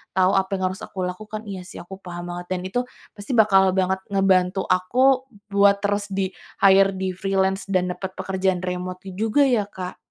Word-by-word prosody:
tahu 185 Hz, 0 st, +4 dB
apa 190 Hz, +1 st, +1 dB
yang 190 Hz, -, -3 dB
harus 190 Hz, -, -8 dB
aku 190 Hz, -, -7 dB
lakukan. 215 Hz, +4 st, -5 dB
Iya 190 Hz, -2 st, -5 dB
sih -, -, -9 dB
aku 190 Hz, +2 st, -10 dB
paham 175 Hz, -2 st, -8 dB
banget 175 Hz, 0 st, -6 dB
dan 180 Hz, -, -3 dB
itu 190 Hz, +6 st, -2 dB, 0.4 s
pasti 205 Hz, +5 st, -5 dB
bakal 195 Hz, -4 st, +5 dB
banget 190 Hz, 0 st, +1 dB, 0.2 s
ngebantu 190 Hz, -1 st, +2 dB
aku 255 Hz, +9 st, +3 dB, 0.2 s
buat 200 Hz, 0 st, +4 dB
terus 205 Hz, 0 st, 0 dB
di-hire 195 Hz, 0 st, +2 dB
di-freelance 190 Hz, +1 st, -1 dB
dan 185 Hz, -2 st, 0 dB
dapet 190 Hz, +1 st, -5 dB
pekerjaan 190 Hz, -1 st, -1 dB
remote 180 Hz, 0 st, -4 dB
itu 195 Hz, +4 st, -3 dB
juga 255 Hz, +7 st, +3 dB
ya 220 Hz, -5 st, +2 dB
Kak? 185 Hz, -2 st, -7 dB
190 Hz, 180 wpm, -23 LUFS, 185-200 Hz, 0.4 s, bakal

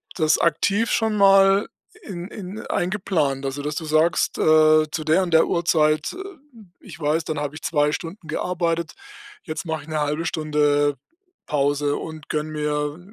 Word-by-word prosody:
das 155 Hz, -2 st, +2 dB
aktiv 195 Hz, +7 st, +1 dB
schon 220 Hz, -1 st, +1 dB
mal 195 Hz, 0 st, +5 dB, 0.3 s
i 430 Hz, -6 st, -18 dB
in 175 Hz, -2 st, -6 dB
in 200 Hz, 0 st, -8 dB
eingeplant? 175 Hz, -8 st, -1 dB
Also, 135 Hz, +1 st, -3 dB
dass 150 Hz, +1 st, -3 dB
du 160 Hz, -, -4 dB
sagst, 155 Hz, +2 st, +1 dB
äh: 155 Hz, 0 st, +5 dB
„Zu 155 Hz, -, -3 dB
der 160 Hz, +5 st, +3 dB
und 175 Hz, -2 st, -4 dB
der 160 Hz, -, +5 dB
Uhrzeit, 155 Hz, -3 st, +1 dB
äh, -, -, -10 dB, 0.6 s
ich -, -, -12 dB
weiß, 155 Hz, +2 st, 0 dB
dann 155 Hz, -1 st, -3 dB
habe 145 Hz, 0 st, -4 dB
ich 155 Hz, -, -9 dB
2 150 Hz, -2 st, +1 dB
Stunden 165 Hz, +2 st, -7 dB
gearbeitet. 170 Hz, 0 st, -2 dB, 0.5 s
Jetzt 160 Hz, 0 st, -6 dB
mache 160 Hz, -3 st, -4 dB
ich -, -, -17 dB
'ne 155 Hz, -1 st, -2 dB
1/2 150 Hz, +3 st, -1 dB
Stunde 150 Hz, -2 st, +1 dB, 0.5 s
Pause 145 Hz, 0 st, 0 dB
und 160 Hz, -1 st, -9 dB
gönne 155 Hz, 0 st, -2 dB
mir 150 Hz, 0 st, -2 dB
155 Hz, 170 wpm, -22 LUFS, 150-175 Hz, 0.6 s, mal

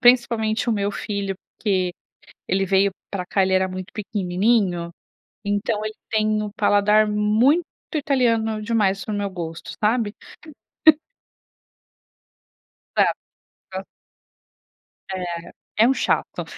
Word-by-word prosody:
principalmente 240 Hz, -2 st, +3 dB
o -, -, +3 dB
meu 205 Hz, -1 st, 0 dB
filho, 200 Hz, -2 st, -3 dB, 0.2 s
porque 185 Hz, -4 st, 0 dB, 0.6 s
ele 195 Hz, +1 st, +1 dB
veio 195 Hz, +1 st, +3 dB, 0.2 s
pra 185 Hz, -3 st, -3 dB
cá 195 Hz, +2 st, +1 dB
ele 190 Hz, -, 0 dB
era 185 Hz, 0 st, +3 dB
muito 185 Hz, 0 st, -7 dB
pequenininho, 190 Hz, -3 st, 0 dB, 0.5 s
então 205 Hz, +1 st, -1 dB
ele 215 Hz, -, -3 dB, 0.2 s
tem 215 Hz, -1 st, +1 dB
o 210 Hz, -, -3 dB
paladar 210 Hz, +1 st, +4 dB
muito 215 Hz, +10 st, +3 dB, 0.3 s
italiano 230 Hz, -7 st, +1 dB
demais 210 Hz, -3 st, +1 dB
pro 215 Hz, -, -4 dB
meu 205 Hz, -1 st, -1 dB
gosto, 170 Hz, -3 st, -6 dB
sabe? 220 Hz, -1 st, +2 dB, 2.8 s
Exato, -, -, +3 dB, 0.6 s
hã. 190 Hz, +1 st, -3 dB, 1.3 s
É, 185 Hz, -1 st, -3 dB, 0.6 s
é -, -, +6 dB
um 265 Hz, -, +4 dB
chato! -, -, -1 dB
210 Hz, 110 wpm, -23 LUFS, 190-220 Hz, 2.8 s, é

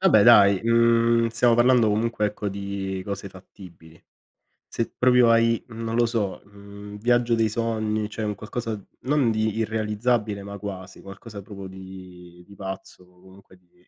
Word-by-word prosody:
Vabbè, 185 Hz, -, +5 dB
dai, 100 Hz, -4 st, +6 dB
mhmm, 115 Hz, 0 st, +3 dB
stiamo 115 Hz, +1 st, +3 dB
parlando, 120 Hz, -1 st, +4 dB
comunque, 105 Hz, 0 st, 0 dB
ecco, 105 Hz, 0 st, -4 dB
di 100 Hz, -1 st, -5 dB
cose 100 Hz, 0 st, -5 dB
fattibili. 90 Hz, -3 st, -15 dB, 0.7 s
Se 115 Hz, -, -3 dB
proprio 125 Hz, -1 st, +5 dB
hai, 115 Hz, 0 st, +3 dB
non 115 Hz, -1 st, -5 dB
lo 120 Hz, 0 st, +3 dB
so, 110 Hz, -5 st, -2 dB
mhmm, 100 Hz, 0 st, -12 dB
viaggio 120 Hz, +2 st, +2 dB
dei 115 Hz, -1 st, +2 dB
sogni, 110 Hz, -1 st, -2 dB
cioè 110 Hz, +1 st, -5 dB
un 105 Hz, -1 st, -1 dB
qualcosa 110 Hz, +1 st, -5 dB, 0.2 s
non 135 Hz, -1 st, +1 dB
di 110 Hz, -1 st, -1 dB
irrealizzabile 110 Hz, -1 st, -1 dB
ma 100 Hz, +1 st, -8 dB
quasi, 95 Hz, -2 st, -8 dB
qualcosa 100 Hz, +2 st, -10 dB
proprio 100 Hz, -1 st, -9 dB
di 95 Hz, -2 st, -12 dB
di 100 Hz, -, -16 dB
pazzo 95 Hz, -1 st, -8 dB
o 90 Hz, 0 st, -25 dB
comunque 95 Hz, 0 st, -18 dB
di 90 Hz, -1 st, -30 dB
105 Hz, 155 wpm, -24 LUFS, 95-115 Hz, 0.7 s, dai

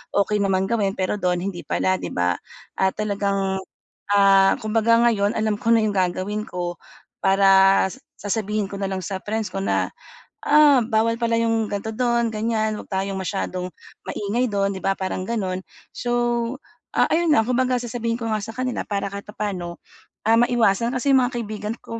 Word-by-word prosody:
okey 205 Hz, +1 st, +2 dB
naman 190 Hz, -1 st, +1 dB
gawin, 205 Hz, -3 st, 0 dB
pero 185 Hz, +2 st, 0 dB
do'n 180 Hz, -2 st, +1 dB
hindi 190 Hz, -3 st, -4 dB
pala, 185 Hz, -, +1 dB
'di -, -, -5 dB
ba? 90 Hz, 0 st, +1 dB, 0.4 s
Ah, 190 Hz, 0 st, +2 dB
talagang, 200 Hz, -2 st, -1 dB, 0.5 s
ah, 195 Hz, -1 st, +5 dB
kumbaga 225 Hz, +1 st, +2 dB
ngayon 205 Hz, -3 st, +2 dB
alam 215 Hz, -1 st, 0 dB
ko 230 Hz, -, +1 dB
na 230 Hz, -, +6 dB
yung 210 Hz, -1 st, 0 dB
gagawin 190 Hz, +3 st, -1 dB
ko 175 Hz, -1 st, -4 dB, 0.5 s
para 195 Hz, 0 st, +5 dB
sa -, -, -11 dB, 0.3 s
sasabihin 210 Hz, 0 st, -1 dB
ko 200 Hz, -, -6 dB
na 195 Hz, -, -1 dB
lang 190 Hz, -1 st, -3 dB
sa 190 Hz, +2 st, -4 dB
friends 215 Hz, -2 st, -3 dB
ko 195 Hz, -, -3 dB
na, 195 Hz, -, 0 dB, 0.5 s
"Ah, 295 Hz, -2 st, +6 dB
bawal 225 Hz, +1 st, +1 dB
pala 230 Hz, -1 st, +1 dB
yung 225 Hz, -1 st, +1 dB
ganito 205 Hz, +2 st, -4 dB
do'n, 235 Hz, -1 st, +1 dB
ganyan. 215 Hz, -1 st, -1 dB
'Wag -, -, -10 dB
tayong 195 Hz, 0 st, -2 dB
masyadong 185 Hz, -1 st, -3 dB, 0.4 s
maingay 225 Hz, +5 st, -1 dB
do'n," 200 Hz, -2 st, 0 dB
'di 190 Hz, -, -6 dB
ba, 195 Hz, 0 st, +1 dB
parang 185 Hz, 0 st, -4 dB
gano'n. 190 Hz, -6 st, -2 dB, 0.3 s
So, 240 Hz, -, -3 dB, 0.8 s
ah, -, -, +4 dB
ayun 335 Hz, +1 st, +2 dB
nga, 225 Hz, -, +4 dB
kumbaga 255 Hz, +1 st, +1 dB
sasabihin 235 Hz, -1 st, -3 dB
ko 230 Hz, -2 st, -3 dB
nga 215 Hz, -, 0 dB
sa 225 Hz, +2 st, -7 dB
kanila 255 Hz, -1 st, -2 dB
para 200 Hz, -1 st, -2 dB
kahit 200 Hz, 0 st, -7 dB
papa'no, 195 Hz, -5 st, -4 dB, 0.5 s
ah, 225 Hz, +1 st, +5 dB
maiwasan. 235 Hz, 0 st, +2 dB
Kasi 265 Hz, +3 st, +1 dB
yung 265 Hz, -, +6 dB
mga 260 Hz, -, -8 dB
kaibigan 215 Hz, -1 st, -4 dB
ko, 230 Hz, 0 st, -6 dB
210 Hz, 180 wpm, -23 LUFS, 195-230 Hz, 0.8 s, na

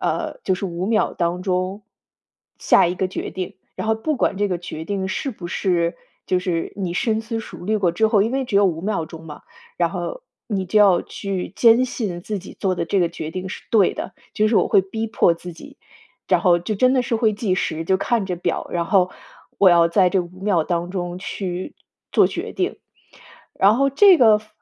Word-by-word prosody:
呃， -, -, -2 dB
就 185 Hz, -1 st, 0 dB
是 195 Hz, -, -5 dB
5 175 Hz, +1 st, -4 dB
秒 220 Hz, 0 st, +1 dB
当 175 Hz, 0 st, -2 dB
中， 185 Hz, +2 st, -2 dB, 0.8 s
下 -, -, +4 dB
一 175 Hz, -, -2 dB
个 190 Hz, -, 0 dB
决 185 Hz, -, -5 dB
定。 185 Hz, -1 st, -5 dB, 0.2 s
然 -, -, -4 dB
后 220 Hz, -, +2 dB
不 290 Hz, +7 st, -2 dB
管 200 Hz, -, 0 dB
这 205 Hz, 0 st, +1 dB
个 180 Hz, -, -1 dB
决 160 Hz, -2 st, -7 dB
定 195 Hz, -2 st, -2 dB
是 270 Hz, +8 st, -3 dB
不 190 Hz, -7 st, -8 dB
是 170 Hz, -1 st, 0 dB, 0.3 s
就 185 Hz, -, +1 dB
是 180 Hz, -2 st, -2 dB
你 185 Hz, -4 st, -3 dB
深 220 Hz, +3 st, 0 dB
思 225 Hz, 0 st, -4 dB
熟 -, -, -10 dB
虑 215 Hz, +1 st, +1 dB
过 185 Hz, -5 st, +1 dB
之 220 Hz, +6 st, +2 dB
后 210 Hz, -2 st, +4 dB
因 225 Hz, +3 st, -1 dB
为 270 Hz, 0 st, 0 dB
只 200 Hz, -, 0 dB
有 200 Hz, -, +5 dB
5 170 Hz, -4 st, 0 dB
秒 195 Hz, -3 st, -1 dB
钟 165 Hz, 0 st, -11 dB
嘛， 150 Hz, -2 st, -10 dB, 0.3 s
然 -, -, +1 dB
后 -, -, -5 dB, 0.2 s
你 195 Hz, -4 st, -2 dB
就 210 Hz, +4 st, +2 dB
要 190 Hz, -4 st, +5 dB
去 190 Hz, -3 st, -5 dB
坚 235 Hz, +3 st, +5 dB
信 205 Hz, -9 st, -4 dB
自 210 Hz, +2 st, -4 dB
己 185 Hz, -, -12 dB
做 190 Hz, -2 st, 0 dB
的 170 Hz, -, -3 dB
这 195 Hz, -, +1 dB
个 170 Hz, -2 st, +1 dB
决 160 Hz, -2 st, -6 dB
定 185 Hz, +2 st, -5 dB
是 -, -, -7 dB
对 210 Hz, -5 st, +4 dB
的， 190 Hz, -, -6 dB, 0.2 s
就 215 Hz, 0 st, +2 dB
是 215 Hz, -, +2 dB
我 -, -, +3 dB
会 -, -, +4 dB
逼 220 Hz, +4 st, -4 dB
迫 180 Hz, -6 st, +3 dB
自 175 Hz, +1 st, -9 dB
己， 165 Hz, -, -13 dB, 0.5 s
然 -, -, +3 dB
后 175 Hz, -3 st, +4 dB
就 175 Hz, +5 st, -3 dB
真 255 Hz, +6 st, +3 dB
的 255 Hz, -, +2 dB
是 240 Hz, -1 st, -1 dB
会 220 Hz, -2 st, +2 dB
计 205 Hz, -3 st, 0 dB
时， 165 Hz, -3 st, -2 dB
就 190 Hz, +3 st, +2 dB
看 235 Hz, -1 st, 0 dB
着 185 Hz, -, -2 dB
表， 175 Hz, -, -2 dB
然 170 Hz, -1 st, -1 dB
后 185 Hz, 0 st, +3 dB, 0.5 s
我 200 Hz, -, +7 dB
要 170 Hz, -1 st, +5 dB
在 185 Hz, +2 st, +4 dB
这 190 Hz, +1 st, +1 dB
5 180 Hz, +1 st, -10 dB
秒 190 Hz, -5 st, +1 dB
当 175 Hz, +1 st, -2 dB
中 175 Hz, -1 st, -4 dB
去 185 Hz, -1 st, -5 dB, 0.4 s
做 -, -, +5 dB
决 -, -, -5 dB
定， 370 Hz, +2 st, -2 dB, 0.8 s
然 200 Hz, +3 st, +5 dB
后 275 Hz, +2 st, +2 dB
这 375 Hz, +7 st, +7 dB
个 220 Hz, -5 st, +6 dB
方 215 Hz, 0 st, -19 dB
190 Hz, 235 characters per minute, -21 LUFS, 175-215 Hz, 0.8 s, 我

